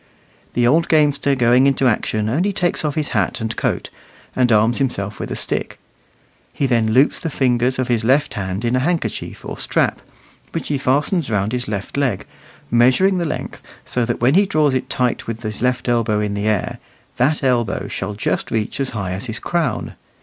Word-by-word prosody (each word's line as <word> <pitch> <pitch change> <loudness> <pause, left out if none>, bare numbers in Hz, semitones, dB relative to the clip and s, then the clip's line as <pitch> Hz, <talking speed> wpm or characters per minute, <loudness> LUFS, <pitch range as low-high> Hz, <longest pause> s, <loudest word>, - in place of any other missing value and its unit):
The 120 - +3
old 160 +7 +3
gamester 145 -3 +3
going 125 +1 +4
into 135 -1 +2
action 110 -2 0
only 170 - +1
takes 180 -4 0
off 150 -2 -1
his 150 -2 -1
hat 105 -7 0
and 110 0 -3
coat, - - -2 0.4
and 125 -2 +2
arms 110 +2 +3
himself 105 -7 -2
with - - -4
a - - -3
stick; - - -3 0.7
he 140 - -1
then 115 -4 +2
loops 130 +6 +3
the 165 - -3
fingers 125 -2 +1
of 130 -1 -1
his 120 -3 +1
left 135 +5 +2
hand 95 +2 -3
in 120 +2 +1
a - - +3
handkerchief 170 +5 -2
or - - -6
strap, - - 0 0.5
which - - -4
he 145 -2 0
fastens 145 +5 +1
round 105 -1 0
his 125 0 -2
left 105 +4 -4
leg, 130 -9 0 0.5
measuring 130 +11 +4
the 170 - -1
length, 150 - -5 0.2
so 125 - 0
that 120 0 -3
when 125 +3 +4
he 195 +3 +4
draws 155 -7 +2
it 130 - -2
tight 125 -2 -1
with 115 +1 -5
his 105 -1 -5
left 125 0 0
elbow 115 -3 +1
in 105 -1 -1
the 100 +1 -2
air, 105 -3 -1 0.4
that 140 +5 +1
elbow 120 -4 0
shall 100 +2 -4
just 105 - -1
reach 110 +3 -2
as 135 -1 0
high 95 -3 -3
as 95 +4 -4
his 110 -2 -4
crown. 160 -9 -2
125 Hz, 200 wpm, -20 LUFS, 110-140 Hz, 0.7 s, going